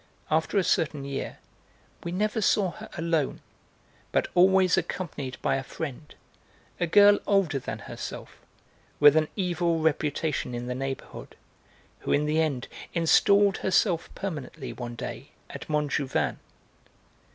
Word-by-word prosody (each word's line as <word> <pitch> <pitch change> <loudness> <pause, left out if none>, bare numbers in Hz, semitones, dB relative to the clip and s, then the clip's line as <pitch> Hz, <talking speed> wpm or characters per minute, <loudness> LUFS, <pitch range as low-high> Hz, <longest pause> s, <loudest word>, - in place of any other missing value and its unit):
After 160 +5 +1
a 195 - +4
certain 150 -4 0
year 140 -1 -4 0.7
we 170 - -4
never 210 +4 0
saw 195 -2 +2
her - - -11
alone, 165 -3 0 0.7
but - - +1
always 185 0 +5
accompanied 140 -8 -4
by - - +2
a 135 - -4
friend, 150 +1 -7 0.6
a 175 - +1
girl 205 +4 +7
older 190 -9 +2
than 125 - -5
herself, - - -8 0.6
with 145 0 +8
an 155 -1 +3
evil 175 -3 0
reputation 155 -4 -1
in 120 0 -4
the 125 - -3
neighbourhood, 135 +1 -6 0.6
who - - -4
in 150 - +3
the 155 +2 +2
end 140 -5 -1 0.3
installed 200 +4 +4
herself 175 -3 +1
permanently, 160 -9 -5
one 120 -1 -6
day, - - -7 0.2
at - - -9
Montjouvain. 140 - 0
160 Hz, 130 wpm, -27 LUFS, 140-185 Hz, 0.7 s, with